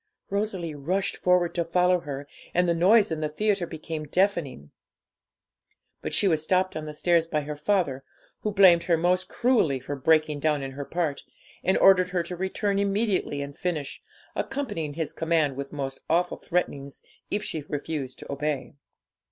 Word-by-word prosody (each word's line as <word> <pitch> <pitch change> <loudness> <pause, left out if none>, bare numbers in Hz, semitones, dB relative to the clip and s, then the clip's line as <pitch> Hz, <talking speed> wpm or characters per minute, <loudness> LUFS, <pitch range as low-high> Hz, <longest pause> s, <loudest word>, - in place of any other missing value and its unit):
Rosalie 195 -5 -2
rushed 175 +7 -1
forward 180 -1 +2
to 170 - 0
follow 180 +2 +2
her, 145 -3 -6 0.3
and 180 0 +3
the 170 - +3
noise 195 +5 +4
in 160 - -1
the 155 -1 -1
theatre 195 +2 0
became 155 -1 -6
deafening. 170 - 0 1.3
But - - -3
she 200 - +3
was 160 -4 +2
stopped 185 +2 +1
on 155 -1 -4
the 150 - -6
stairs 170 +1 +2
by 155 -2 0
her 150 +1 -5
father, 150 -4 0 0.4
who 210 - -2
blamed 185 -4 +6
her 170 -2 +3
most 180 +2 +1
cruelly 225 - +2
for 140 +3 -5
breaking 155 +1 +2
down 150 -1 +1
in 135 - -5
her 140 +1 -6
part, 160 -4 -2 0.4
and 190 - +3
ordered 185 -2 +6
her 180 -1 0
to 180 +1 -6
return 195 +2 -1
immediately 200 -7 0
and 140 0 -8
finish, 160 -6 -3 0.3
accompanying 205 - -3
his 160 -1 -2
command 160 -4 +1
with 140 0 -6
most 135 -2 -4
awful 175 +2 +2
threatenings 140 -6 -3 0.3
if 210 +1 0
she 155 - -3
refused 145 -3 -4
to - - -8
obey. 145 -1 -2
165 Hz, 170 wpm, -26 LUFS, 145-185 Hz, 1.3 s, blamed